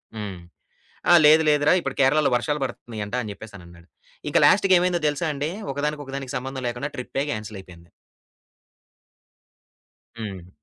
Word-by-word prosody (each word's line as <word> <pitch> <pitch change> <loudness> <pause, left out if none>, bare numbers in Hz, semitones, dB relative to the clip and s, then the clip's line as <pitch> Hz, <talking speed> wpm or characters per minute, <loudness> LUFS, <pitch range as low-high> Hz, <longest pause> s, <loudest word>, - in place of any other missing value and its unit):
హ్మ్. 105 -3 -6 0.7
"ఆ! - - +8
లేదు 155 +2 +7
లేదు 150 -1 +3
రా, - - +6
ఇప్పుడు - - -4
కేరళలో 145 +3 +3
వర్షాలు 150 +4 -1
బడుతున్నయి 120 -4 -6
అంట" 105 - -12
అని 110 -4 -6
జెప్పేసని 100 -4 -12
అన్నాడు. 85 0 -17 0.4
ఇక - - +2
లాస్ట్‌కి 195 -1 +5
ఏమైందో 175 -1 0
తెలుసా 150 +3 -1
అండి. 145 +3 -3 0.2
ఒకదానికి, 150 +1 -2
ఒకదానికి 135 -1 -6
సంబంధం 130 0 -6
లేకుండా 120 +5 -4
ట్రిప్పే, 130 +2 -3
క్యాన్సెల్ 110 -3 -6
అయిపోయింది. 85 -2 -16 2.3
హ్మ్. 95 -6 -7
130 Hz, 145 wpm, -23 LUFS, 105-150 Hz, 2.3 s, ఆ